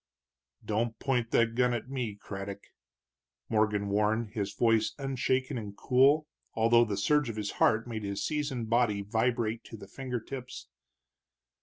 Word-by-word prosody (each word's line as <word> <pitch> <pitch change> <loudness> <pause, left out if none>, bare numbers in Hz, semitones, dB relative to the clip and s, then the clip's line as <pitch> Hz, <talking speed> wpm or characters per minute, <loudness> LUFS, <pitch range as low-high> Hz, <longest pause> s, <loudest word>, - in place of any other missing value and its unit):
"Don't 110 +1 -1
point 125 -3 0
that 115 -1 +3
gun 125 0 +2
at 120 - -5
me, 125 -6 -3
Craddock!" 100 -1 -7 0.9
Morgan 105 -2 +1
warned, 105 +2 +1
his 105 -3 -2
voice 115 0 +2
unshaken 130 -2 -1
and 100 -2 -8
cool, 140 +4 +4 0.3
although 115 +1 +5
the 105 -3 -3
surge 150 +6 +2
of 115 - -4
his 105 -2 -3
heart 110 +1 +4
made 110 -2 -4
his 100 0 -3
seasoned 145 -6 -2
body 110 -3 +2
vibrate 115 +1 0
to 115 - -9
the 100 - -11
finger 125 +3 -4
tips. 130 +2 -8
115 Hz, 150 wpm, -30 LUFS, 105-125 Hz, 0.9 s, although